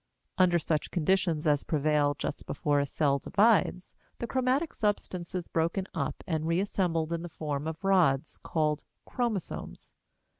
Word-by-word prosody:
Under 180 -2 +5
such 155 -2 -1
conditions 170 -2 +1
as 145 -2 +3
prevail 150 -1 +1
just 150 - -4
before 145 -1 +1
a 140 - 0
cell 140 -1 +1
divides, 200 - +2 0.2
the - - -3
chromatic 260 +6 0
substance 185 -4 -2
is 180 -2 -3
broken 170 +4 0
up - - -3
and 160 -2 -1
reassembled 170 -2 0
in 165 - -2
the 175 - -6
form 150 -2 -3
of 160 +3 -5
rods 165 -7 +2
called 150 -2 0 0.2
chromosomes. 230 -7 -4
165 Hz, 145 wpm, -29 LUFS, 150-190 Hz, 0.2 s, Under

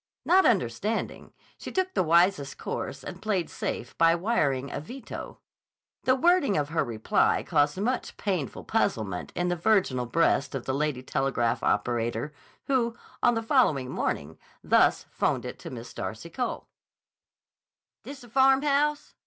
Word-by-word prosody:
Not 375 +2 +5
understanding, - - -1 0.3
she - - -7
took 375 0 -1
the - - +2
wisest 170 -3 +3
course 135 -1 -5
and 185 +4 -8
played 200 -6 -1
safe 120 - -4
by 165 0 +5
wiring 145 - 0
a - - -3
veto. 245 - -8 0.7
The 260 - +4
wording 315 - +3
of 145 -1 -1
her 160 0 +1
reply 110 -2 +1
caused 145 +4 +1
much 245 +5 -2
painful 180 - -3
puzzlement 95 -5 -1
in 175 0 0
the 175 - +1
virginal 170 - +1
breast 140 -1 +1
of 130 - -4
the 130 - -1
lady 140 -2 -1
telegraph 130 -4 0
operator 115 +5 -1 0.3
who, 235 -4 0 0.2
on 240 - +4
the 225 - -1
following 160 - +2
morning, 75 +3 -3 0.2
thus - - +3
'phoned - - 0
it - - -7
to - - -8
Miss 120 -1 -9
Darcy 115 +10 -6
Cole: 250 +5 -3 1.4
"This 280 0 -9
the 245 - -13
Farmhouse?... 275 +3 +2
165 Hz, 145 wpm, -27 LUFS, -, 1.4 s, Not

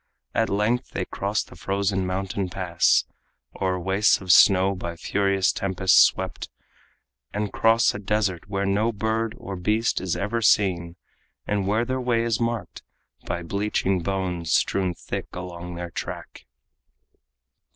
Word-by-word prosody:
At 115 - +1
length 105 +5 0
they - - -2
cross - - -2
the - - -15
frozen 100 -1 -1
mountain 95 0 -2
pass, 90 -3 +2 0.6
O'er 95 -1 0
wastes 95 +4 +3
of 95 -2 0
snow 95 +1 +6
by 85 -2 -5
furious 95 +2 +1
tempests 95 -1 +3
swept, - - +1 0.9
And 105 -1 -2
cross 115 +1 +3
a - - -5
desert 100 -3 -1
where 100 0 -1
no 105 +4 +1
bird 110 +1 -2
or 95 - -7
beast 105 +5 0
Is 95 -2 -2
ever 105 +4 -2
seen, 90 -5 +2 0.5
and 100 -2 -1
where 110 +4 +1
their 130 +1 -2
way 120 -2 +1
is 115 -2 0
marked 115 -2 -3 0.5
By 85 - -3
bleaching 95 0 -1
bones 90 -3 -2
strewn 95 -2 +1
thick - - -5
along 90 -1 -7
their 85 0 -6
track. - - -7
95 Hz, 140 wpm, -24 LUFS, 90-105 Hz, 0.9 s, snow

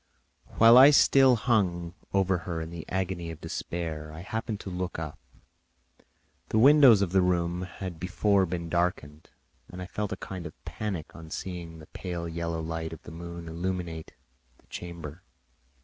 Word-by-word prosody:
While 115 +2 +9
I 135 +2 +10
still 135 -3 +6
hung 95 -8 0 0.2
over 95 -2 +2
her 85 -1 -4
in 80 0 -6
the 85 -2 -8
agony 90 -2 -2
of 80 -2 -8
despair, 80 -3 -5
I 80 +2 -9
happened 110 +2 -4
to 95 - -7
look 90 0 -3
up. 80 -2 -6 1.3
The - - 0
windows 130 -4 +7
of 90 - -2
the 95 0 +4
room 90 -1 0
had 90 -2 -7
before 95 +2 +2
been 85 0 -4
darkened, 85 -3 -2 0.4
and 90 - -9
I 90 - -5
felt 105 +2 -4
a 95 - -3
kind 90 -4 -6
of 75 - -12
panic 95 -7 -5
on 80 -1 -10
seeing 85 -2 -6
the 80 - -12
pale 85 0 -5
yellow 85 0 -3
light 80 0 -4
of 80 - -11
the - - -10
moon 85 0 -8
illuminate 85 -1 -4 0.4
the - - -28
chamber. 85 -2 -8
85 Hz, 165 wpm, -28 LUFS, 80-95 Hz, 1.3 s, I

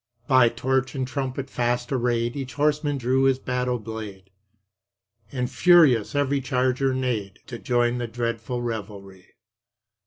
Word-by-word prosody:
By 130 -3 +5
torch 130 +2 -1
and 130 -1 -2
trumpet 135 0 -4
fast 120 +1 -1
arrayed 120 -2 0
Each 135 -3 -6
horseman 145 0 +1
drew 130 +1 +1
his 135 -1 +3
battle 125 -1 -2
blade, 105 -4 -8 1.0
And 125 -2 -2
furious 140 - +4
every 140 -1 +1
charger 130 +1 0
neighed, 120 -7 -2
To 120 -2 -8
join 120 0 +1
the 120 - -3
dreadful 115 +1 -3
revelry. 100 -5 -7
125 Hz, 130 wpm, -24 LUFS, 115-135 Hz, 1.0 s, By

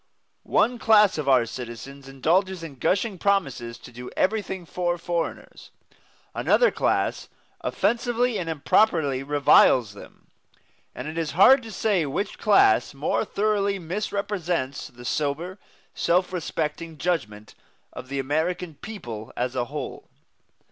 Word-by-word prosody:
One 245 0 +2
class 210 -6 +5
of 140 -2 -1
our 130 -3 +5
citizens 125 +4 -8
indulges 175 +7 0
in 140 -6 -9
gushing 190 - 0
promises 135 -13 0
to 125 - -13
do 125 +1 -9
everything 190 -3 -1
for 175 +1 -2
foreigners, 170 0 -4 0.6
another - - +3
class - - -1 0.3
offensively 240 0 0
and 170 -2 -4
improperly 155 -3 +2
reviles 135 -5 +4
them; 100 - -15 0.6
and 125 - -6
it 160 +2 -4
is 160 -3 -2
hard 260 +8 +7
to 225 -2 -9
say 195 -7 0
which 175 +10 -3
class 145 - +4
more 145 +9 0
thoroughly 200 -1 0
misrepresents 180 -5 -3
the 120 0 -14
sober, 155 +9 -2 0.3
self 180 +2 +1
respecting 160 -1 -3
judgment 110 -11 -3 0.4
of 125 - -8
the 140 +1 -4
American 160 +5 -1
people 120 - -7
as 125 +1 -2
a 125 -1 0
whole. 140 +1 -7
165 Hz, 125 wpm, -25 LUFS, 135-195 Hz, 0.6 s, hard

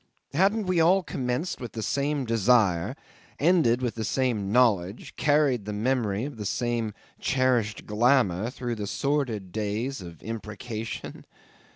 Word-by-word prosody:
Hadn't 200 +7 +2
we 185 -2 +1
all 180 +4 +4
commenced 130 +3 -3
with 120 - -6
the 110 - -4
same 140 +1 0
desire, 110 -3 +3 0.4
ended 150 -7 +3
with 120 - 0
the 110 - -4
same 110 -4 0
knowledge, 105 -5 +2
carried 145 -7 +2
the 105 - -4
memory 110 -1 0
of 140 -4 -7
the 105 - -5
same 120 -2 -1 0.2
cherished 125 -5 +1
glamour 110 -3 +2
through 125 -2 -4
the 105 -3 -4
sordid 125 -9 -1
days 110 +5 -2
of 85 -3 -11
imprecation? 110 +1 -6
120 Hz, 140 wpm, -27 LUFS, 105-135 Hz, 0.4 s, all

